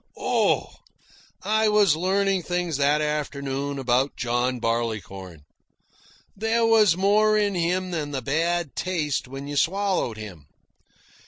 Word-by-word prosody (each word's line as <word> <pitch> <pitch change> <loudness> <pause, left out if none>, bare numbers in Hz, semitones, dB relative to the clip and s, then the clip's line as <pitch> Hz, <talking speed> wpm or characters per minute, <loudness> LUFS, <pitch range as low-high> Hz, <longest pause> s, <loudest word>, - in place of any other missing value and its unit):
Oh! - - +1 0.7
I 220 +1 +2
was 205 -6 +4
learning 190 +2 +1
things 175 -3 -2
that 145 +2 +2
afternoon 140 -2 -3
about 130 +1 0
John 120 +1 -1
Barleycorn. 100 -8 -3 0.9
There 225 +3 +1
was 215 -6 +4
more 215 +2 +3
in 205 -1 +1
him 180 +1 -1
than 155 -4 -3
the 135 -3 -4
bad 165 +3 -1
taste 155 -8 -2
when 135 +2 -8
you 145 - -5
swallowed 190 - 0
him. 90 -9 -10
150 Hz, 120 wpm, -24 LUFS, 130-190 Hz, 0.9 s, was